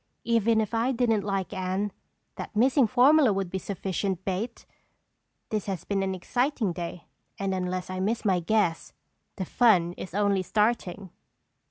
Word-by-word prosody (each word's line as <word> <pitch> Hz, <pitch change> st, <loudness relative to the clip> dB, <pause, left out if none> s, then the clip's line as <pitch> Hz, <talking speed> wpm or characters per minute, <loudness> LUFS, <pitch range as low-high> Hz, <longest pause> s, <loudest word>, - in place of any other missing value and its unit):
"Even 230 Hz, -1 st, +2 dB
if 215 Hz, -, -4 dB
I 230 Hz, +3 st, +1 dB
didn't 230 Hz, -4 st, +2 dB
like 195 Hz, -1 st, -2 dB
Anne, 190 Hz, +2 st, -2 dB, 0.4 s
that -, -, -7 dB
missing 255 Hz, +3 st, +4 dB
formula 265 Hz, +2 st, +5 dB
would 195 Hz, -2 st, -2 dB
be 190 Hz, -, -2 dB
sufficient 190 Hz, -1 st, -3 dB
bait! 205 Hz, +5 st, -3 dB, 0.8 s
This 215 Hz, -2 st, -2 dB
has 190 Hz, -4 st, -3 dB
been 200 Hz, -1 st, -1 dB
an 190 Hz, -1 st, -1 dB
exciting 245 Hz, -, -1 dB
day 170 Hz, 0 st, -6 dB, 0.3 s
and 195 Hz, -1 st, -1 dB
unless 185 Hz, -1 st, -2 dB
I 185 Hz, 0 st, -5 dB
miss 220 Hz, +5 st, -1 dB
my 190 Hz, -3 st, +3 dB
guess 175 Hz, -2 st, 0 dB, 0.4 s
the 190 Hz, -, -3 dB
fun 180 Hz, -6 st, +3 dB
is 185 Hz, -, -7 dB
only 200 Hz, -2 st, +2 dB
starting!" 205 Hz, -2 st, -1 dB
200 Hz, 155 wpm, -27 LUFS, 185-225 Hz, 0.8 s, formula